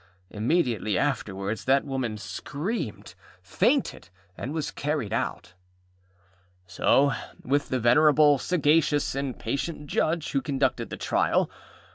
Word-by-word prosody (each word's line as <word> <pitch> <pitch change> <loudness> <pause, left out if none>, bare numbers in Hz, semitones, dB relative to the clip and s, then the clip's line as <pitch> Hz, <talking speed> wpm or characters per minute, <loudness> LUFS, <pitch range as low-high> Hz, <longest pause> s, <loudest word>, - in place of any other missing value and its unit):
Immediately 115 - 0
afterwards 105 -7 -2
that 135 +2 +3
woman 130 -6 -3
screamed, 150 - -5 0.3
fainted, 85 - 0 0.3
and 125 - -5
was 155 -2 -3
carried 145 -8 -2
out. 90 -5 -3 1.1
So 135 +8 +3 0.3
with 140 +2 0
the 130 - 0
venerable, 145 +4 +5
sagacious, 150 -3 +2
and 135 -2 -3
patient 145 +6 -3
Judge 160 +2 -1
who 135 - +1
conducted 135 -3 -1
the - - -6
trial. - - +1
140 Hz, 110 wpm, -26 LUFS, 115-150 Hz, 1.1 s, venerable